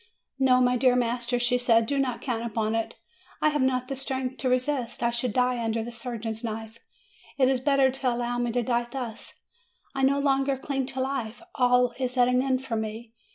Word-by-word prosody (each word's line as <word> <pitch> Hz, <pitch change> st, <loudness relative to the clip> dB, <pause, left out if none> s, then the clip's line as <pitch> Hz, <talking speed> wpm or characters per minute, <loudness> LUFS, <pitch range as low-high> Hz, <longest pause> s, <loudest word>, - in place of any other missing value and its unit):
"No, 255 Hz, -1 st, +5 dB
my 250 Hz, 0 st, +3 dB
dear 250 Hz, 0 st, +4 dB
master," 245 Hz, 0 st, 0 dB
she 245 Hz, +1 st, +2 dB
said; 230 Hz, -2 st, +4 dB
"do 280 Hz, +4 st, -1 dB
not 255 Hz, -3 st, -1 dB
count 235 Hz, -4 st, -2 dB
upon 220 Hz, -1 st, -1 dB
it; 225 Hz, 0 st, -2 dB, 0.4 s
I 305 Hz, -, +3 dB
have 295 Hz, -2 st, 0 dB
not 255 Hz, -1 st, +1 dB
the 275 Hz, -, -3 dB
strength 265 Hz, -1 st, -3 dB
to 260 Hz, -, -1 dB
resist; 255 Hz, -2 st, -1 dB
I 235 Hz, -, +2 dB
should 240 Hz, 0 st, 0 dB
die 250 Hz, +1 st, +1 dB
under 225 Hz, 0 st, -1 dB
the 240 Hz, -, -6 dB
surgeon's 230 Hz, -1 st, -5 dB
knife. 225 Hz, 0 st, -6 dB, 0.6 s
It 260 Hz, -2 st, +4 dB
is 265 Hz, -1 st, +1 dB
better 275 Hz, 0 st, +3 dB
to 260 Hz, 0 st, -1 dB
allow 240 Hz, 0 st, -2 dB
me 240 Hz, -1 st, 0 dB
to 245 Hz, 0 st, +1 dB
die 240 Hz, 0 st, 0 dB
thus. 240 Hz, -4 st, -7 dB, 0.5 s
I 270 Hz, -, -2 dB
no 270 Hz, +1 st, +3 dB
longer 275 Hz, -1 st, +1 dB
cling 270 Hz, -1 st, -3 dB
to 265 Hz, -1 st, -4 dB
life. 260 Hz, -1 st, -3 dB
All 250 Hz, -1 st, +3 dB
is 255 Hz, 0 st, -2 dB
at 245 Hz, -1 st, +5 dB
an 250 Hz, 0 st, +3 dB
end 260 Hz, -1 st, 0 dB
for 235 Hz, -, -2 dB
me. 220 Hz, +1 st, -5 dB
250 Hz, 210 wpm, -26 LUFS, 235-265 Hz, 0.6 s, No